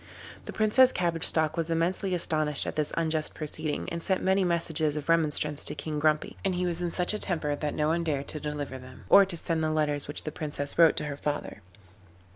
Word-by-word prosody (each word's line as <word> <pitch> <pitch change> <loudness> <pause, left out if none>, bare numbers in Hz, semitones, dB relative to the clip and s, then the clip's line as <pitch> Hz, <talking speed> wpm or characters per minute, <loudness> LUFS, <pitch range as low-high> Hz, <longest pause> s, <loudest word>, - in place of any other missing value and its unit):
The - - -6
Princess 235 +4 +4
Cabbage 170 -2 0
Stalk 155 -1 0
was 165 -1 -2
immensely 180 +3 +1
astonished 155 -4 +2
at - - -4
this 150 -1 +1
unjust 160 -2 -1
proceeding, 155 0 -3
and 170 0 -3
sent 190 +2 0
many 190 +1 +3
messages 160 -3 0
of 150 +1 -6
remonstrance 150 -2 +1
to - - -3
King 150 +1 -4
Grumpy, 155 0 0
but 190 -2 0
he 180 0 -1
was 175 -1 -2
in 175 - -1
such 180 +3 0
a 215 - -2
temper 160 -7 -1
that 150 0 -3
no 150 0 +1
one 170 +1 0
dared 145 -4 -2
to 155 - -4
deliver 145 -3 -5
them, 130 0 -13
or 200 - +8
to 185 -3 -5
send 165 0 -1
the 155 - +1
letters 150 -2 -1
which 145 - -2
the 155 - -4
Princess 145 0 -5
wrote 165 -2 +6
to 150 - 0
her 145 -1 -5
father. 145 -7 -4
155 Hz, 225 wpm, -28 LUFS, 150-170 Hz, -, or